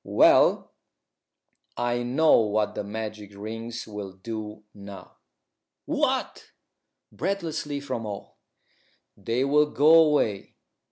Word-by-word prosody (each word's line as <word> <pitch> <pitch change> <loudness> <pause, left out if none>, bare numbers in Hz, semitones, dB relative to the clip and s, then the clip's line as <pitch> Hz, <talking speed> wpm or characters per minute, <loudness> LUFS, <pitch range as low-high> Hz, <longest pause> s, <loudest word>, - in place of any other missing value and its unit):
Well, - - +4 1.1
I 120 0 -1
know 135 +6 +4
what 105 -1 0
the - - -4
magic 105 -1 -7
rings 115 +3 -6
will 105 -3 -7
do 105 +1 -7
now." 100 -1 -12 0.7
"What?" - - -2 0.6
breathlessly, 160 -7 -3
from 130 -5 -5
all. 100 -1 -8 0.8
"They 115 +6 -1
will 150 +2 +3
go 150 +2 +4
away. 150 -11 +3
115 Hz, 100 wpm, -25 LUFS, 105-140 Hz, 1.1 s, Well